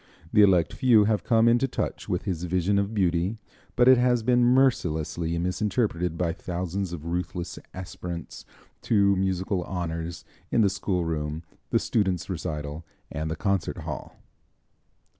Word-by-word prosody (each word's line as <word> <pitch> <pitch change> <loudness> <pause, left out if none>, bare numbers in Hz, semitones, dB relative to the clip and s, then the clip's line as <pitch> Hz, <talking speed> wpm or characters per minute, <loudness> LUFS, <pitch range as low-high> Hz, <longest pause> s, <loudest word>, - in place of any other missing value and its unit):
The 105 - +6
elect 90 -6 +4
few 120 -5 +5
have 105 -1 +1
come 115 0 +3
into 120 +3 +4
touch - - -4
with 90 +1 -1
his 90 -4 -3
vision 95 +3 +1
of 100 +1 -1
beauty, 90 +2 +1 0.4
but 125 - +4
it 130 -1 +7
has 125 -2 +2
been 120 +1 +3
mercilessly 85 - +2
misinterpreted 90 -1 -1
by 85 -2 0
thousands 90 +1 -4
of 85 -3 -7
ruthless 90 +1 -4
aspirants 90 -2 -7 0.4
to 100 -3 +3
musical 95 0 -1
honors, 85 -1 -4 0.2
in - - +3
the 100 -3 +3
schoolroom, 80 -5 -2 0.3
the - - +3
students' 95 -4 0
recital 75 -2 -4 0.3
and 80 +1 -3
the 80 - -2
concert 100 -2 -1
hall. - - -6
90 Hz, 140 wpm, -26 LUFS, 85-105 Hz, 0.4 s, it